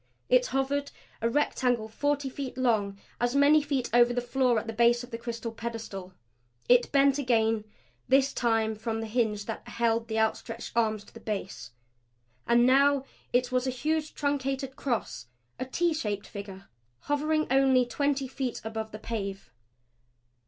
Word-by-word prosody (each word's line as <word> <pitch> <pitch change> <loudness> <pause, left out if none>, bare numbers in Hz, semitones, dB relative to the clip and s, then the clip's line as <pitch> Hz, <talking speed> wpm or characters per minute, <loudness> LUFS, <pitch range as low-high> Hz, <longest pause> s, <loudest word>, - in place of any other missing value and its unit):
It - - +4
hovered, 280 +1 -1 0.3
a 230 - +2
rectangle 245 -4 +1
forty 285 +5 -1
feet 265 -1 -6
long, 215 -6 +1 0.2
as 245 +2 0
many 290 +2 +6
feet 280 -4 -1
over 240 0 +5
the - - +2
floor 245 0 +1
at 220 - -1
the 225 - -5
base 235 +2 +3
of 245 - -11
the 230 - -4
crystal 235 -1 -5
pedestal. 225 -5 -6 0.5
It 245 0 +4
bent 275 0 +4
again, 225 -4 +1 0.4
this 270 +2 +3
time 225 -2 +1
from 225 +1 -3
the 225 - -3
hinge 215 -2 0
that 225 - -6
held 230 -1 0
the 220 -1 -2
outstretched 225 +1 -1
arms 220 -3 +1
to - - -19
the - - -10
base. 195 - -5 0.8
And 240 0 +5
now 275 +1 +4 0.3
it 250 +1 +1
was 255 +1 +1
a - - +2
huge 305 +5 -2
truncated 270 -2 -2
cross, 235 - -3 0.3
a 255 - -2
T 340 +6 +1
shaped 210 -9 -3
figure, 195 -2 -9 0.3
hovering 310 +2 0
only 265 -2 +4
twenty 275 +2 -1
feet 260 -1 -3
above 220 0 -5
the 215 - -6
pave. 200 - -5
240 Hz, 160 wpm, -28 LUFS, 220-270 Hz, 0.8 s, many